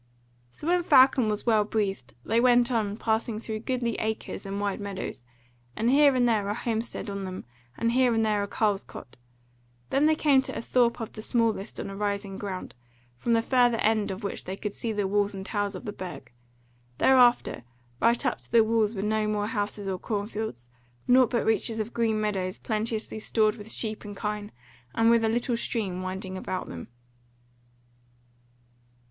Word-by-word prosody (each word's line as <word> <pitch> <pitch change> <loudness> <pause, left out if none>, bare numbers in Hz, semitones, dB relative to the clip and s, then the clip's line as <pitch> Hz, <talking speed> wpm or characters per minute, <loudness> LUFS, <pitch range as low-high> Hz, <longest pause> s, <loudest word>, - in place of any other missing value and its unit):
So, 210 - -11
when 355 +2 +3
Falcon 260 -7 +5
was 210 0 -2
well 220 -3 +4
breathed, 200 - -2
they 225 +2 +2
went 245 0 +4
on, 210 -3 0
passing 220 0 -1
through 220 -1 -5
goodly 240 0 -1
acres 220 -2 -4
and 195 +1 -3
wide 205 -1 -1
meadows, 195 -10 -5 0.5
with 230 +2 +1
here 280 0 +5
and 245 -1 +3
there 210 -4 +1
a 205 - -1
homestead 230 0 -3
on 200 -1 -4
them, 185 -5 -6 0.3
and 230 0 +1
here 250 0 +3
and 225 0 +2
there 210 -1 +1
a 200 - -2
carle's 205 -1 0
cot. - - -12 0.7
Then 280 +3 +4
came 290 -3 +4
they - - -9
to - - -5
a - - -3
thorp 240 0 +2
of 225 - -6
the 215 - -7
smallest 225 -3 0
on - - -4
a - - -7
rising 200 -1 -3
ground, 190 -2 -5 0.5
from 235 - +1
the 225 0 +3
further 245 -2 +3
end 215 -1 +1
of 190 +3 -5
which 200 - -4
they 190 +1 -5
could 210 -1 -4
see 230 - -3
the 205 -2 -1
walls 205 0 +1
and 190 0 -6
towers 205 -1 -2
of 185 - -8
the 210 - -4
Burg. 175 -11 -8 0.7
Thereafter 245 - +4 0.4
right 235 +1 +2
up - - 0
to - - -18
the 230 -1 +6
walls 220 0 +1
were 195 - -3
no 215 0 +1
more 210 -1 0
houses 205 -2 -3
or 190 -1 -2
cornfields, 205 - -4 0.4
nought 250 -1 +6
but 235 - 0
reaches 225 0 +1
of 215 +2 -3
green 225 -2 +1
meadows 195 -3 -1
plenteously 220 0 -2
stored 215 0 +1
with 215 0 -9
sheep 215 -2 -2
and 205 -1 -8
kine, 210 -1 -4 0.4
and 225 0 +4
with 230 -1 +4
a 220 - +2
little 240 +1 0
stream 195 -6 -3
winding 185 0 -5
about 185 0 -4
them. 85 -1 -7
215 Hz, 190 wpm, -27 LUFS, 200-235 Hz, 0.7 s, the